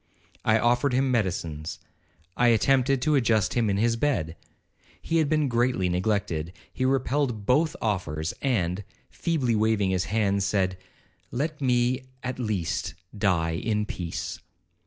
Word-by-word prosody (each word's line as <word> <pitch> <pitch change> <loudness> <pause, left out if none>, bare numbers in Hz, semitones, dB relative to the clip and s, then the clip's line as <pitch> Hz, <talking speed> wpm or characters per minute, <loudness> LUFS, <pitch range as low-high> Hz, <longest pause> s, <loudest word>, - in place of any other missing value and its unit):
'I 110 0 +4
offered 120 +4 +2
him 130 +1 +2
medicines—I 90 0 -3
attempted 130 +3 +3
to 155 - +2
adjust 115 -7 +2
him 115 -3 +1
in 100 - +1
his 115 +2 +2
bed. 115 - 0 0.6
He 165 - -1
had 155 -3 +2
been 155 -2 +2
greatly 120 -6 +1
neglected. 90 -3 -1 0.2
He 130 - -1
repelled 130 -4 0
both 150 +7 +2
offers, 85 -7 -1
and, 100 -8 0 0.3
feebly 135 -9 0
waving 105 -3 +2
his 90 -2 0
hand, 100 +1 +1
said, 95 -1 0 0.5
'Let 150 +4 -3
me, 125 0 +2 0.2
at 125 0 -4
least, 105 -8 -2 0.2
die 90 -6 +1
in 105 +5 -1
peace.' 85 -3 -5
110 Hz, 135 wpm, -26 LUFS, 95-130 Hz, 0.6 s, I